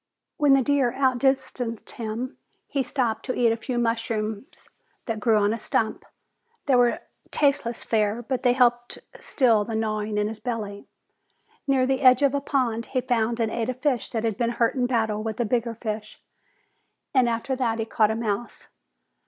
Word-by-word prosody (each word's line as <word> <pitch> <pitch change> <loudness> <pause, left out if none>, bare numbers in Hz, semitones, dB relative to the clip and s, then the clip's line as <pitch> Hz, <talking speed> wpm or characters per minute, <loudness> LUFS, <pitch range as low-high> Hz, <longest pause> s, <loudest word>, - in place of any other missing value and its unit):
When 290 -2 +5
the 270 - +3
deer 275 -2 +2
outdistanced 260 -3 0
him, 235 +3 -5 0.3
he 280 - -1
stopped 250 -3 -1
to 255 - -1
eat 235 -2 +3
a - - +1
few 240 +2 -4
mushrooms 225 -1 -2 0.4
that 225 -2 -3
grew 220 0 +3
on 205 +1 +2
a 230 - -4
stump. 220 0 -1 0.6
They 275 - +2
were 245 -1 +3 0.3
tasteless 275 -5 0
fare, 215 +1 0
but 260 +1 -2
they 245 -1 +4
helped 240 -1 +2 0.2
still 235 - +2
the 225 +1 -5
gnawing 215 -1 -1
in 210 0 +1
his 220 0 -6
belly. 210 -4 -5 0.8
Near 265 -2 +3
the 265 +1 0
edge 255 +1 +6
of 280 -1 +3
a 280 - 0
pond, 245 -5 -1
he 255 - -1
found 235 -2 0
and 225 -1 0
ate 230 +1 -2
a 255 - -2
fish 255 -1 -1
that 225 -2 -3
had 220 -3 -1
been 235 -1 +1
hurt 230 -1 +2
in 250 -2 0
battle 220 -4 0
with 220 0 -4
a 240 - +1
bigger 235 +1 -1
fish, 215 -1 -5 0.9
and 255 -3 +4
after 235 +3 -2
that 235 -3 0
he 225 - -2
caught 220 -1 +2
a 220 - 0
mouse. 225 0 -4
235 Hz, 185 wpm, -25 LUFS, 220-255 Hz, 0.9 s, edge